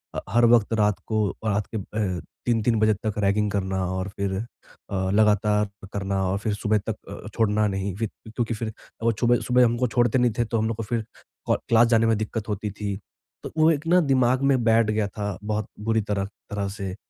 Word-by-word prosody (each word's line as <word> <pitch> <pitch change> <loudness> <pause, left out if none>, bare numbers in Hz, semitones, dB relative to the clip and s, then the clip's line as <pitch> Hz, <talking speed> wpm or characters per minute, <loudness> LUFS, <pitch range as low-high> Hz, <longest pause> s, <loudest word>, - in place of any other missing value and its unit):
अ, - - 0
हर 120 +1 +4
वक्त 115 -1 +3
रात 105 -2 +2
को 110 -2 +1 0.2
रात 105 -1 0
के - - +1
अ, 95 -4 -3 0.2
3-3 115 -1 +2
बजे 110 0 +4
तक 110 - -1
रैगिंग 105 +1 +2
करना 95 -1 -1
और 95 +1 -3
फिर 100 -1 -1 0.6
अ, 95 -1 0
लगातार 105 0 +3 0.3
करना 100 -1 -1
और 95 +2 0
फिर 105 0 -1
सुबह 105 +1 +1
तक 110 - -1 0.3
अ, - - -7
छोड़ना 110 -1 +2
नहीं 95 -1 -2
फिर, 110 +1 -2 0.2
क्योंकि 115 +1 -2
फिर 110 0 -4 0.3
वो 115 - +4
चुबह 120 +2 +2
सुबह 125 0 +5
हमको 120 +2 +1
छोड़ते 120 0 +2
नहीं 125 -1 +3
थे 120 - +3
तो 115 +1 -1
हम 110 - +1
लोग 115 -1 -3
को 115 - -3
फिर 115 0 -2 0.5
हो - - +4
क्लास 115 0 +6
जाने 115 -1 +4
में 115 -1 +3
दिक्कत 110 0 -4
होती 105 0 -2
थी। 100 0 -4 0.5
तो - - -6
वो 155 +1 +5
एक 155 +1 -2
ना 180 +2 +5
दिमाग 130 -3 +2
में 130 -3 +2
बैठ 115 -1 +4
गया 105 -1 0
था 100 -1 -4
बहुत 105 0 -2
बुरी 110 +1 +1
तरह 100 -1 -2
तरह 100 0 -6
से, 95 -2 -5
110 Hz, 215 wpm, -25 LUFS, 100-115 Hz, 0.6 s, क्लास